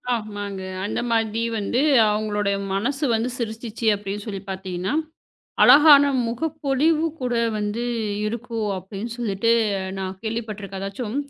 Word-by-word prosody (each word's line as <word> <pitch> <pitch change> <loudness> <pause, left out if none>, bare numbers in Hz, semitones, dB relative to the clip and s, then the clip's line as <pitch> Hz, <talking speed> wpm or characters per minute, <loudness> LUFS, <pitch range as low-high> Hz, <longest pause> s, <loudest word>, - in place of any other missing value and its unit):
ஆமாங்க. 205 -3 -5 0.2
அந்த 210 - -2
மாதிரி 225 0 +1 0.2
வந்து 235 +6 0 0.3
அவங்களுடைய 210 -1 0 0.2
மனசு 270 +9 -1
வந்து 230 +3 -1
சிரிச்சுச்சு 230 0 -5
அப்படின்னு 205 0 -5
சொல்லிப் 195 -1 -6
பார்த்தீங்கன்னா, 190 +1 -3 0.7
அழகான 290 -1 +8 0.2
முகப்பொலிவு 305 +4 0
கூட 250 -2 -2 0.2
வந்து 210 +3 -2 0.4
இருக்கும் 230 -1 -3
அப்படின்னு 195 +5 -7
சொல்லிட்டு 230 -1 0 0.5
நான் 190 0 -4
கேள்விப்பட்டிருக்கேன். 215 -4 -5
ஏதாச்சும் 210 +4 -4
215 Hz, 110 wpm, -23 LUFS, 200-240 Hz, 0.7 s, அழகான